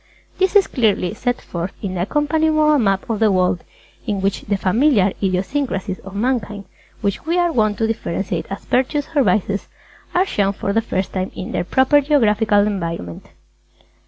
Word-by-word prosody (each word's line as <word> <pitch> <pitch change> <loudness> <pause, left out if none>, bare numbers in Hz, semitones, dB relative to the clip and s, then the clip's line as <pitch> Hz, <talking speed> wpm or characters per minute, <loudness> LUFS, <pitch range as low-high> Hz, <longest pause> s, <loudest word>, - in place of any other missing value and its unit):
This 380 +1 +2
is 405 - +6
clearly 210 -6 0
set 245 +3 -2
forth 175 +2 -5
in 195 -3 -4
the 180 - -2
accompanying 310 - +1
Moral 305 -1 +4
Map 195 0 +1
of 225 -3 -2
the 220 -2 +4
World 180 -2 +1 0.4
in 205 -3 -1
which 195 0 -1
the 200 -1 -1
familiar 200 0 +3
idiosyncrasies 195 +1 -1
of 195 +1 -11
Mankind 210 -3 -1 0.4
which 200 -2 -1
we 340 +2 +1
are 350 -1 +2
wont 215 -7 +1
to 225 - +1
differentiate 200 -3 -3
as 195 - -7
Virtues 270 +3 0
or 285 - +5
Vices 200 -2 0 0.5
are 365 +2 +4
shown 200 - 0
for 200 0 -3
the 225 - +2
first 190 -4 -3
time 185 0 -2
in 185 - -6
their - - -1
proper 265 +9 +3
geographical 215 -7 +3
environment. 170 - -4
210 Hz, 175 wpm, -20 LUFS, 195-265 Hz, 0.5 s, is